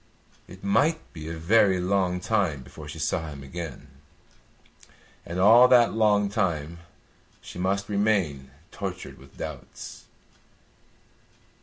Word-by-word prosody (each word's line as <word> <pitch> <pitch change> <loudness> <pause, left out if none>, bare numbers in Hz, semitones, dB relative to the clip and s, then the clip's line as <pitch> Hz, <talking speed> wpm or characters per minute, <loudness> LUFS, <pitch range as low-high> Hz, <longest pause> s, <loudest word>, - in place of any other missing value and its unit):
It 95 +1 -13
might 150 +11 +1
be 80 -2 -7
a 80 - -5
very 95 +2 +3
long 90 -1 0
time 90 - 0
before 75 +3 -11
she 75 - -8
saw 80 +1 -1
him 70 -2 -9
again, 80 0 -7 1.4
and 85 +2 -4
all 115 +6 +8
that 120 -2 +5
long 105 -2 +3
time 85 -6 -2 0.6
she - - -10
must 100 +2 -1
remain 100 -10 0 0.2
tortured 95 -3 -6
with 70 +1 -18
doubts. 75 -5 -8
90 Hz, 120 wpm, -26 LUFS, 80-105 Hz, 1.4 s, all